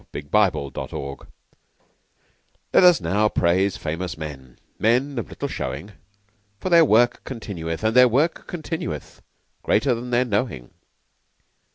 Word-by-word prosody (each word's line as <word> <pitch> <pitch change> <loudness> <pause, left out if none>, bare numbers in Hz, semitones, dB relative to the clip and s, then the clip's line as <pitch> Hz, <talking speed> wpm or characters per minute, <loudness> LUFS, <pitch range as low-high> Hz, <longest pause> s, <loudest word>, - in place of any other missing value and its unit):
By 105 -2 +5
Rudyard 70 -5 -6 0.2
Kipling 70 0 -6 1.6
"Let - - +6
us 180 - +6
now 100 +6 +1
praise 95 +2 +1
famous 80 +1 -4
men" 70 -5 -9 0.2
Men 125 +4 +1
of 115 - -6
little - - -5
showing 85 +11 -5 0.7
For - - -3
their 170 -1 +7
work 120 -1 +3
continueth, 90 -9 -6
And 110 +1 +1
their 125 0 +8
work 140 +8 0
continueth, 160 - -6 0.4
Greater 125 +4 +2
than 120 +1 -5
their 125 +1 +2
knowing. 105 - -2
105 Hz, 130 wpm, -23 LUFS, 80-125 Hz, 1.6 s, their